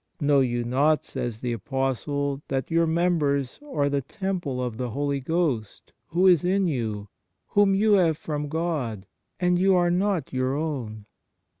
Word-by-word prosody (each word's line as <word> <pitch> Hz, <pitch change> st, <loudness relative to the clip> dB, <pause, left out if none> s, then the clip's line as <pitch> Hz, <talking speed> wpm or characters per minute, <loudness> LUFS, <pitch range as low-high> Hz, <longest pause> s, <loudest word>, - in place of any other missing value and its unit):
" -, -, -48 dB
Know 145 Hz, -2 st, +3 dB
you 120 Hz, -2 st, +1 dB
not," 140 Hz, +6 st, +2 dB
says 120 Hz, -4 st, -5 dB
the 125 Hz, -1 st, -1 dB
Apostle, 135 Hz, +4 st, -2 dB
" -, -, -51 dB
that 135 Hz, +2 st, -2 dB
your 165 Hz, 0 st, +3 dB
members 155 Hz, -6 st, 0 dB
are 145 Hz, -, +1 dB
the 140 Hz, 0 st, 0 dB
temple 175 Hz, -4 st, -3 dB
of 125 Hz, -3 st, -3 dB
the 125 Hz, -1 st, -3 dB
Holy 140 Hz, +3 st, -1 dB
Ghost, 135 Hz, -7 st, -2 dB
who 175 Hz, +3 st, +1 dB
is 180 Hz, -5 st, +6 dB
in 190 Hz, +2 st, +2 dB
you, 110 Hz, -, -2 dB, 0.4 s
whom 200 Hz, -1 st, +4 dB
you 215 Hz, +2 st, +3 dB
have 170 Hz, -6 st, +3 dB
from 150 Hz, -2 st, -4 dB
God, 145 Hz, -, -2 dB, 0.3 s
and 180 Hz, 0 st, +2 dB
you 190 Hz, +1 st, +4 dB
are 175 Hz, -1 st, +3 dB
not 180 Hz, -6 st, 0 dB
your 130 Hz, +1 st, 0 dB
own 125 Hz, -9 st, -4 dB
145 Hz, 170 wpm, -25 LUFS, 130-175 Hz, 0.4 s, is